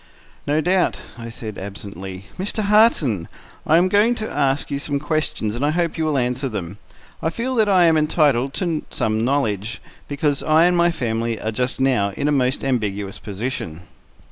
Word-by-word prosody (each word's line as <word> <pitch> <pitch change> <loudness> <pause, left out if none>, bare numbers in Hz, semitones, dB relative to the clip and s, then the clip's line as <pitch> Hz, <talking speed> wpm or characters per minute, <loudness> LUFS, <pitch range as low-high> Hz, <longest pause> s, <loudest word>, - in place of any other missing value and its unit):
"No 150 +2 +2
doubt," 180 +3 +1 0.2
I 115 -1 -8
said 110 -2 -7
absently. 95 -1 -7
"Mr. 210 +3 -2
Harton, 200 - +3 0.4
I 160 - +5
am 180 +2 +4
going 210 +5 +3
to 220 -2 -4
ask 140 -1 0
you 140 - -1
some 145 0 -1
questions, 150 -7 -1
and 120 +4 -3
I 145 - +3
hope 170 +1 0
you 160 - -1
will 150 -2 +1
answer 125 +2 0
them. 100 -2 -5 0.4
I 160 - +1
feel 235 +9 -3
that 220 -4 +3
I 185 -3 +5
am 165 -2 +5
entitled 145 -4 +2
to 170 -5 -1
some 110 0 -1
knowledge, 110 -6 -1 0.3
because 145 0 0
I 155 +2 +4
and 180 0 +3
my 175 0 +4
family 115 -6 -2
are 110 - -2
just 125 +4 -1
now 125 -7 +2
in 145 - 0
a - - +2
most 130 -2 +1
ambiguous 105 -7 -2
position." 100 -6 -5
140 Hz, 185 wpm, -21 LUFS, 110-165 Hz, 0.4 s, I